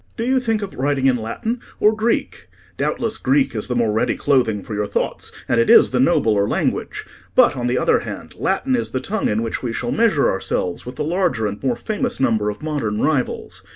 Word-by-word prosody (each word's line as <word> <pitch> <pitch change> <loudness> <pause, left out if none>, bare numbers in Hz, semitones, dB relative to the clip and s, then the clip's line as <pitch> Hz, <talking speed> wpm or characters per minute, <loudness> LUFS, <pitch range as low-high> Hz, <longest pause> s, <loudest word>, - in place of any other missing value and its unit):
"Do 230 - -2
you 260 +1 +2
think 225 -4 -1
of 195 - -6
writing 135 0 0
in 130 -2 +4
Latin 125 - -3 0.2
or 215 +1 +4
Greek? 225 +2 -1 0.3
Doubtless 225 -2 -2
Greek 135 +1 +2
is 110 - -3
the 125 - -2
more 115 -3 +2
ready 110 - +1
clothing 120 -8 +1
for 110 - -7
your 105 0 -1
thoughts, - - -2 0.2
and 120 -1 +3
it 115 - 0
is - - +7
the 125 - +1
nobler 115 -9 +3
language. - - -2 0.3
But, - - +5
on 125 -1 -2
the 125 +1 +1
other - - +3
hand, - - -8
Latin 255 +8 0
is 235 - -2
the 130 - 0
tongue 205 +9 -2
in 105 +2 0
which 115 - -3
we 120 -3 -3
shall 240 - -3
measure 220 - +3
ourselves 95 0 -2
with 125 - -7
the 150 - -2
larger 165 - 0
and 100 0 -4
more 130 -3 0
famous 210 - -2
number 110 -5 +1
of 105 +6 -7
modern 135 -9 -2
rivals. 140 -3 -1
130 Hz, 220 wpm, -20 LUFS, -, 0.3 s, is